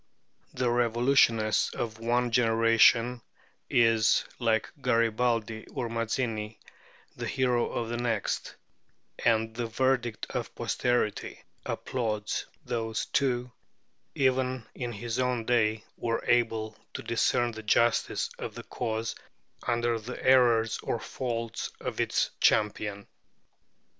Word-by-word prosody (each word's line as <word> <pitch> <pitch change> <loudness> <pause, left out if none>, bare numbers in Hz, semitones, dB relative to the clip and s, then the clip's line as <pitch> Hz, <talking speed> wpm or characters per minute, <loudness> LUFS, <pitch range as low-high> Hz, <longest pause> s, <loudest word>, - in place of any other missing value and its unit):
The 125 -2 +1
revolutionist 120 -2 +3
of 110 -1 -4
one 120 +1 +1
generation 115 +1 +4 0.5
is, 115 -2 +4
like 110 -3 +1
Garibaldi 115 -2 +1
or 125 -5 -4
Mazzini, 115 -1 -2 0.6
the - - -4
hero 125 -2 +1
of 115 -1 -3
the 120 - -2
next; 115 -3 -2 0.7
and 110 -1 +2
the 120 -1 -2
verdict 120 -1 0
of - - -4
posterity 120 -4 -1 0.2
applauds 110 -4 -2 0.2
those 115 -3 -2
who, 125 -3 +1 0.6
even 130 -2 +1
in 120 -2 -4
his 115 +2 -4
own 125 -3 0
day, 110 -3 +2
were 115 -1 -2
able 110 -2 +1 0.2
to - - -5
discern 115 +1 +1
the 110 -1 -8
justice 115 +2 +2
of - - -6
the - - -7
cause 115 -1 -3 0.5
under 120 -1 +1
the 120 +3 -7
errors 120 -4 +4
or 115 - -2
faults 115 -3 -4
of - - -5
its - - +1
champion. 105 -1 +1
115 Hz, 115 wpm, -28 LUFS, 110-120 Hz, 0.7 s, generation